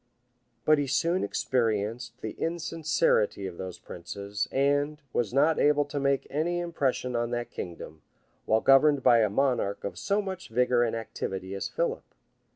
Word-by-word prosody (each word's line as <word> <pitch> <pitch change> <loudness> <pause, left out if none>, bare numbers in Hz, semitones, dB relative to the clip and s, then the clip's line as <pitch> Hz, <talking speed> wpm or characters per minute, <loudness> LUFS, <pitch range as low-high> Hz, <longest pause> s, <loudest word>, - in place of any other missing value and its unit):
[] 120 -2 -45
But 155 -1 +5
he 145 - -1
soon 170 +7 +1
experienced 115 0 -1
the 110 - -4
insincerity 160 - 0
of 90 -2 -7
those 95 -1 -6
princes; 100 +4 -5
and; 145 +2 +1
was 115 -4 0
not 145 +5 +3
able 145 0 +3
to 145 0 -4
make 140 -1 +1
any 165 +5 0
impression 140 -7 -1
on 120 0 0
that 120 0 -3
kingdom, 80 -3 -8 0.5
while 110 0 +3
governed 135 0 +5
by 120 - +6
a 110 -2 +3
monarch 125 -3 0
of 95 -3 -5
so 200 +1 +1
much 190 -2 -5
vigor 125 +1 +2
and 115 -1 +1
activity 95 -4 -5
as 100 - -3
Philip. - - -3
125 Hz, 160 wpm, -28 LUFS, 110-150 Hz, 0.5 s, by